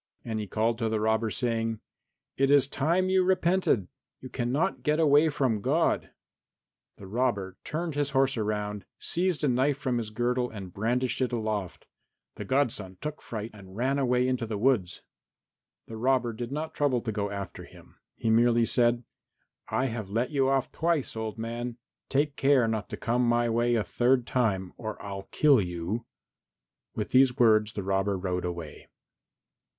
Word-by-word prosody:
And 110 -2 -2
he 105 - -4
called 115 +3 0
to 115 -2 0
the 110 -1 0
robber 110 +1 +1
saying, 115 -1 -1 0.6
"It 135 0 +2
is 140 -1 +6
time 170 +7 +1
you 190 -1 +4
repented. 180 - +2 0.3
You 130 - -9
cannot 130 +9 -1
get 150 +1 +1
away 150 0 +5
from 130 -8 0
God." - - +1 0.9
The 100 - -11
robber 100 -3 -1
turned 165 +1 -3
his 145 0 0
horse 135 -1 +2
round, 105 -2 -2
seized 175 -2 -1
a - - +3
knife 130 +3 +2
from 130 -4 -1
his 110 -2 -4
girdle 125 +2 0
and 95 -5 -9
brandished 120 +5 -1
it 130 - +1
aloft. 110 -5 -3 0.5
The - - -7
godson 115 -9 -1
took 150 +1 -5
fright 110 0 -6
and 95 -3 -13
ran 130 +5 0
away 125 -1 +2
into 125 -3 -1
the 110 -1 -3
wood. 105 -6 +2 0.9
The 110 - -8
robber 125 0 +1
did 120 +2 -6
not 155 +2 -4
trouble 135 -5 +1
to 110 - -3
go 100 -1 -2
after 100 -1 -6
him, - - -17 0.2
he 110 - 0
merely 120 +1 +4
said, 120 0 +3 0.7
"I 120 +4 +1
have 110 -5 -4
let 115 +7 -1
you 135 -2 +2
off 135 -1 +1
twice, 165 -6 0
old 110 0 -4
man; 120 +1 -4 0.3
take 145 +1 +1
care 135 -4 +3
not 110 -2 -2
to - - -5
come 120 +2 0
my 120 0 +2
way 120 +1 +2
a 110 - +1
third 125 +2 +2
time, 95 -8 0
or 110 -2 -6
I'll 100 -1 -7
kill 145 -6 +4
you." 90 +6 -4 0.9
With - - -3
these 130 0 +5
words 110 -3 +4
the 100 - -4
robber 95 +1 0
rode 90 -1 -2
away. 85 -4 -6
120 Hz, 170 wpm, -28 LUFS, 110-135 Hz, 0.9 s, is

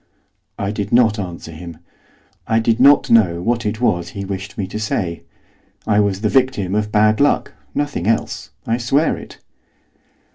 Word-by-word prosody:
I 100 0 -2
did 105 -1 -4
not 115 -3 +4
answer 85 -3 -6
him, 85 0 -9 0.7
I 110 - +2
did 115 +1 +1
not 140 +2 +5
know 95 -7 +4
what 115 +4 -1
it 105 +1 -3
was 90 -8 0
he 100 -1 -6
wished 95 0 -6
me 100 - -2
to 100 +3 -6
say. 90 -6 -2 0.6
I 105 -1 +2
was 100 -2 0
the 110 - +1
victim 125 -6 +1
of 105 0 -1
bad 110 0 +3
luck, 145 - +2 0.2
nothing 145 -11 -2
else, 115 0 -1 0.2
I 115 - 0
swear 135 +6 +1
it. - - -11
105 Hz, 170 wpm, -19 LUFS, 95-115 Hz, 0.7 s, not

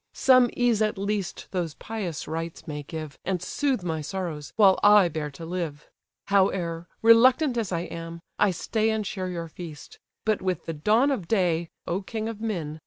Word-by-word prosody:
Some 255 -2 +5
ease 240 -3 +2
at 215 -2 +1
least 200 -1 -3
those 175 -5 -2
pious 200 -8 -5
rites 165 +1 -5
may 150 -1 -4
give, 155 0 -7
And 185 -1 -1
soothe 260 - -1
my 160 -3 -2
sorrows, 155 -3 -5
while 195 -3 +5
I 205 -3 +7
bear 150 -2 -3
to 145 +4 -9
live. 165 -4 -5 0.4
Howe'er, 180 -4 +1 0.2
reluctant 250 +5 +6
as 225 -5 -2
I 170 -1 0
am, 170 -1 -7 0.2
I 205 - +5
stay 215 +5 0
And 220 -1 -1
share 185 -2 -3
your 170 -2 -4
feast; 160 -2 -10 0.3
but 215 -1 +1
with 185 -3 -2
the 165 - -3
dawn 220 - +3
of 200 -11 -2
day, 175 -6 +1 0.2
(O 180 +3 -1
king 220 +2 -4
of 225 -2 -6
men!) 165 -9 -3
185 Hz, 180 wpm, -26 LUFS, 165-215 Hz, 0.4 s, I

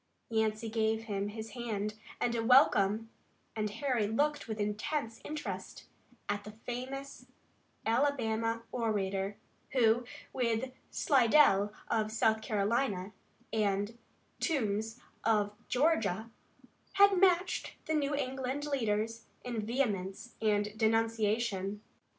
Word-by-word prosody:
Yancey 220 0 +1
gave 220 0 0
him 200 -2 -2
his 220 +1 -6
hand 215 -3 -3 0.3
and 240 - +1
a 230 -1 0
welcome, 225 -3 +5 0.4
and 215 -1 -1
Harry 240 -2 0
looked 290 +7 0
with 220 -1 -4
intense 225 +4 -2
interest 305 0 -6 0.4
at 205 0 -1
the 210 - -9
famous 265 +3 -5 0.6
Alabama 230 -3 +1
orator, 200 -4 -1 0.4
who, 240 -2 +4 0.3
with 245 0 0 0.2
Slidell, 235 -6 +4 0.2
of 215 -2 0
South 220 0 +2
Carolina, 210 -2 0 0.4
and 205 0 0 0.4
Toombs 225 - -1 0.2
of 210 -2 +2
Georgia, 230 - +1 0.6
had 400 -1 +6
matched 365 -1 +2
the 315 - -1
New 290 -2 +1
England 265 +1 -2
leaders 225 -4 -1 0.2
in 235 -3 -3
vehemence 215 -3 -2
and 210 -1 +1
denunciation. 220 -2 +1
225 Hz, 105 wpm, -32 LUFS, 210-255 Hz, 0.6 s, had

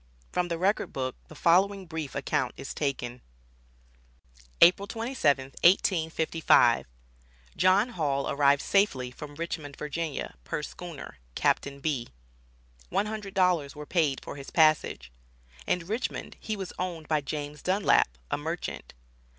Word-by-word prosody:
From 180 -1 0
the 170 -1 -2
record 195 +5 +1
book 130 -1 -3
the 155 - -13
following 190 +5 +3
brief 160 -4 -5
account 140 -2 -1
is - - -6
taken: 125 -4 -3 1.4
"April 185 +3 +6
27, 155 - 0
1855. 165 - +4 0.7
John 190 +6 +4
Hall 145 - -1
arrived 140 0 +3
safely 135 -12 +2
from 145 +3 -9
Richmond, 155 -3 -5
Va., 150 +1 -4
per 150 - -3
schooner, 155 - -8 0.2
(Captain 140 0 +1
B). 140 -5 -1 0.8
One - - +1
hundred 210 -2 -6
dollars 175 -7 +2
were 150 0 -7
paid 150 -5 +1
for - - -7
his 140 - -8
passage." 155 - +2 0.6
In 180 -2 0
Richmond 220 +7 -3
he 215 -1 -4
was 190 -2 -6
owned 175 -4 -4
by 155 -2 +1
James 145 +1 -5
Dunlap, 185 - +2
a - - 0
merchant. 165 - -5
160 Hz, 130 wpm, -28 LUFS, 140-185 Hz, 1.4 s, April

